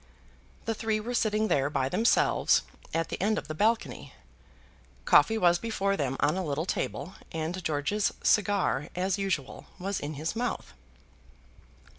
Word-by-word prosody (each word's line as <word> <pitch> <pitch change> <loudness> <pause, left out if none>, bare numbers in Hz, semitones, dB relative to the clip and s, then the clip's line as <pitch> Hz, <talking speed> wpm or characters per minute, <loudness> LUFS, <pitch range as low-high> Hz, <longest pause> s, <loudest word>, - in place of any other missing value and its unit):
The 225 - 0
three 220 0 -1
were 235 +3 -4
sitting 215 -2 +1
there, 140 -6 +2
by 135 -3 0
themselves, 225 - +3 0.3
at 165 0 -1
the - - -4
end 215 +2 +2
of - - -4
the 155 - -4
balcony. 220 +7 0 0.9
Coffee 225 - +5
was 175 -4 +4
before 200 -3 0
them 135 -5 -1
on 145 +3 +3
a 190 - -1
little 155 0 -2
table, 190 0 -3 0.2
and 165 +3 -3
George's 160 +7 0
cigar, 200 -7 +2
as 190 +2 0
usual, 185 -9 -3
was 195 +1 -2
in 150 +1 -5
his 155 +8 -3
mouth. 245 +1 -3
185 Hz, 150 wpm, -28 LUFS, 155-215 Hz, 0.9 s, Coffee